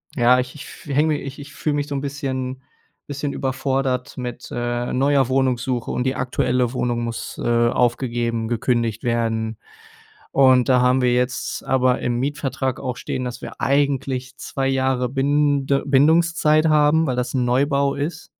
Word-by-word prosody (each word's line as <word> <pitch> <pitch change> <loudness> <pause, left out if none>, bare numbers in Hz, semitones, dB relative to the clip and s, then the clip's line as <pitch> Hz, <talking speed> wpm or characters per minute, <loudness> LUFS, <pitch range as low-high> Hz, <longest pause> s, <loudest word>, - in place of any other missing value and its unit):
Ja, 125 +1 +4
ich 125 +3 -4
ich 145 - -8
f - - -13
hänge 150 +2 +1
ich 140 +1 -7
ich 145 +2 -10
fühle 150 -2 -1
mich 145 0 -1
so 145 - -5
'n 135 - -2
bisschen 130 -2 -4 0.4
bisschen 145 0 -4
überfordert 130 -1 -2
mit, 125 -1 -6
äh, 120 0 -2
neuer 135 0 +2
Wohnungssuche 130 -2 0
und 125 - -1
die 130 - 0
aktuelle 125 -1 0
Wohnung 120 -2 -1
muss, 115 -1 -5
äh, 120 0 +3
aufgegeben 120 -2 0
gekündigt 115 -1 -1
werden. 115 -2 -1 0.7
Und 130 -2 +4
da 125 -1 +5
haben 125 +1 +3
wir 125 - +3
jetzt 125 0 -1
aber 130 -1 +2
im 120 -1 -1
Mietvertrag 135 -1 -2
auch 130 -2 -4
stehen, 130 - -4
dass 125 0 -6
wir - - -9
eigentlich 135 -2 0
2 135 -1 -3
Jahre 130 -2 0
Binde 140 0 +1
Bindungszeit 155 +2 +3
haben, 155 +1 +4
weil 125 - 0
das 125 0 -2
'n 125 -1 +1
Neubau 140 +2 +2
ist. 145 +5 -4
130 Hz, 165 wpm, -21 LUFS, 125-140 Hz, 0.7 s, da